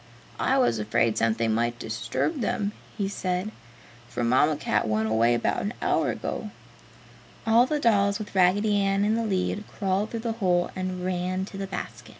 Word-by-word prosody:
"I 270 Hz, -, +2 dB
was 180 Hz, -, +2 dB
afraid 110 Hz, +1 st, +1 dB
something 115 Hz, 0 st, +1 dB
might 120 Hz, +1 st, 0 dB
disturb 115 Hz, -, -2 dB
them," 205 Hz, -1 st, -1 dB, 0.3 s
he 200 Hz, -3 st, 0 dB
said, 185 Hz, 0 st, -2 dB, 0.6 s
"for 120 Hz, -, -3 dB
Mamma 130 Hz, +6 st, +3 dB
Cat 140 Hz, -, 0 dB
went 110 Hz, 0 st, +1 dB
away 115 Hz, +2 st, +3 dB
about 120 Hz, -, 0 dB
an 205 Hz, -, -3 dB
hour -, -, +1 dB
ago." -, -, -4 dB, 1.0 s
All 230 Hz, +3 st, +5 dB
the 300 Hz, +1 st, 0 dB
dolls, 200 Hz, -5 st, +3 dB
with 215 Hz, -1 st, -8 dB
Raggedy 200 Hz, +3 st, +3 dB
Ann 195 Hz, 0 st, +2 dB
in 215 Hz, -, +2 dB
the 230 Hz, +1 st, 0 dB
lead, 200 Hz, 0 st, -1 dB
crawled 195 Hz, +2 st, -1 dB
through 230 Hz, -, -4 dB
the 230 Hz, 0 st, -2 dB
hole 175 Hz, -2 st, +2 dB
and 185 Hz, -1 st, -3 dB
ran 185 Hz, +1 st, -1 dB
to 195 Hz, -, -9 dB
the 195 Hz, -, -3 dB
basket. 120 Hz, -, -7 dB
185 Hz, 175 wpm, -26 LUFS, -, 1.0 s, All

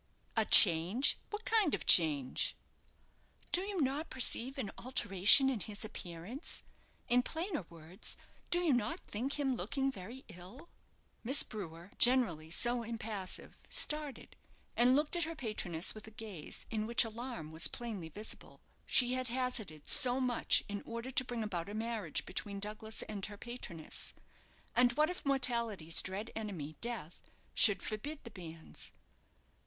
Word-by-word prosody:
"A 220 Hz, -1 st, +2 dB
change! 185 Hz, +9 st, +6 dB
What 420 Hz, +2 st, -6 dB
kind 430 Hz, -9 st, +4 dB
of -, -, -8 dB
change?" 145 Hz, -6 st, +5 dB, 1.0 s
"Do 360 Hz, -, +2 dB
you 395 Hz, -1 st, -4 dB
not 280 Hz, +4 st, -1 dB
perceive 260 Hz, +1 st, +2 dB
an 225 Hz, -7 st, -3 dB
alteration 210 Hz, +1 st, +6 dB
in 260 Hz, -4 st, 0 dB
his 210 Hz, +2 st, -5 dB
appearance? 190 Hz, -, -6 dB, 0.4 s
In 245 Hz, +1 st, +3 dB
plainer 320 Hz, -, -4 dB
words, 170 Hz, +2 st, -5 dB, 0.3 s
do 350 Hz, -, +2 dB
you 330 Hz, -5 st, +2 dB
not 235 Hz, -4 st, -1 dB
think 250 Hz, +7 st, -3 dB
him 270 Hz, -2 st, 0 dB
looking 270 Hz, +2 st, -1 dB
very 240 Hz, +4 st, -10 dB
ill?" 190 Hz, -, -12 dB, 0.5 s
Miss 270 Hz, +6 st, +4 dB
Brewer, 175 Hz, -3 st, -9 dB
generally 230 Hz, -12 st, +3 dB
so 240 Hz, +7 st, +2 dB
impassive, 220 Hz, -4 st, -5 dB
started, 300 Hz, -2 st, +2 dB, 0.4 s
and 245 Hz, +2 st, +4 dB
looked 300 Hz, +4 st, 0 dB
at 340 Hz, -2 st, +1 dB
her 330 Hz, +1 st, -6 dB
patroness 210 Hz, -, 0 dB
with 215 Hz, 0 st, -11 dB
a -, -, -8 dB
gaze 215 Hz, -6 st, -8 dB
in 215 Hz, -1 st, -2 dB
which 235 Hz, +2 st, +5 dB
alarm 225 Hz, -8 st, -7 dB
was 160 Hz, +1 st, +3 dB
plainly 215 Hz, -9 st, -6 dB
visible. 210 Hz, +7 st, -7 dB, 0.3 s
She 250 Hz, -1 st, +4 dB
had 255 Hz, 0 st, -2 dB
hazarded 235 Hz, -, -1 dB
so 250 Hz, 0 st, +3 dB
much 250 Hz, -2 st, +2 dB
in 205 Hz, 0 st, -5 dB
order 235 Hz, +3 st, -7 dB
to 255 Hz, -, +2 dB
bring 240 Hz, -3 st, -4 dB
about 185 Hz, -4 st, -4 dB
a 205 Hz, -, -6 dB
marriage 220 Hz, -7 st, -2 dB
between 200 Hz, +2 st, -3 dB
Douglas 215 Hz, +2 st, -5 dB
and 205 Hz, -2 st, -7 dB
her 205 Hz, 0 st, -10 dB
patroness; 200 Hz, -10 st, -6 dB, 0.6 s
and 245 Hz, -1 st, +4 dB
what 305 Hz, +5 st, +2 dB
if 360 Hz, -, -7 dB
mortality's 235 Hz, -, +1 dB
dread 195 Hz, +4 st, -5 dB
enemy, 180 Hz, -9 st, -6 dB
Death, 230 Hz, -9 st, -6 dB, 0.2 s
should 205 Hz, -3 st, +5 dB
forbid 280 Hz, +8 st, -5 dB
the 235 Hz, -, -10 dB
banns? 165 Hz, -4 st, -8 dB
225 Hz, 150 wpm, -34 LUFS, 190-260 Hz, 1.0 s, change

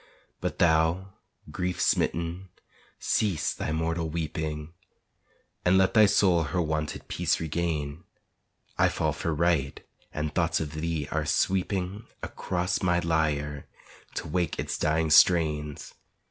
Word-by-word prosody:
But -, -, -3 dB
thou, 85 Hz, +3 st, +2 dB, 0.4 s
grief 90 Hz, -1 st, -2 dB
smitten, 85 Hz, +3 st, 0 dB, 0.5 s
cease 95 Hz, -8 st, 0 dB
thy -, -, -4 dB
mortal 80 Hz, +1 st, -1 dB
weeping 80 Hz, -1 st, -4 dB, 0.9 s
And 90 Hz, +1 st, +4 dB
let 95 Hz, -1 st, +3 dB
thy 110 Hz, -2 st, +7 dB
soul 95 Hz, -4 st, +4 dB
her 90 Hz, +5 st, -2 dB
wonted 80 Hz, -2 st, -2 dB
peace -, -, 0 dB
regain; 80 Hz, -1 st, -3 dB, 0.7 s
I -, -, +5 dB
fall -, -, -1 dB
for 85 Hz, -, -2 dB
right, 80 Hz, -3 st, +1 dB, 0.3 s
and 75 Hz, 0 st, -3 dB
thoughts 85 Hz, -2 st, +1 dB
of 75 Hz, -2 st, -4 dB
thee 80 Hz, -2 st, -2 dB
are 80 Hz, -1 st, -1 dB
sweeping 95 Hz, +4 st, 0 dB, 0.2 s
Across 90 Hz, -1 st, -2 dB
my 85 Hz, -1 st, +2 dB
lyre 75 Hz, -4 st, -1 dB, 0.5 s
to -, -, -4 dB
wake 85 Hz, +1 st, -1 dB
its -, -, -2 dB
dying 80 Hz, 0 st, +1 dB
strains. 75 Hz, -3 st, +3 dB
80 Hz, 125 wpm, -27 LUFS, 75-90 Hz, 0.9 s, thy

